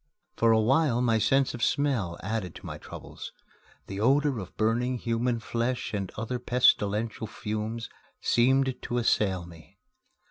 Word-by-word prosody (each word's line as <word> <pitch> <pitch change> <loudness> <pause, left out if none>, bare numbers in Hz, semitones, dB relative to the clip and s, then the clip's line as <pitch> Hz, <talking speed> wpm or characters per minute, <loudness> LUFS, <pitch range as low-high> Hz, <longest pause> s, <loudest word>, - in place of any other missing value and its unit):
For 115 0 +3
a 110 - +5
while 130 +2 +3
my 115 -3 +2
sense 135 +4 +2
of 120 - -7
smell 120 -12 +1
added 100 -3 -3
to - - -11
my - - -6
troubles. - - -9 0.5
The 95 0 -6
odor 135 +2 +3
of 95 -3 -9
burning 120 +3 +1
human 115 +1 -1
flesh 120 +2 -2
and 100 -3 -3
other 115 +3 -3
pestilential 115 -3 +2
fumes 110 +2 -4 0.3
seemed 130 +1 +2
to 120 - -3
assail 95 -6 +1
me. 85 -2 -15
115 Hz, 145 wpm, -28 LUFS, 105-125 Hz, 0.5 s, a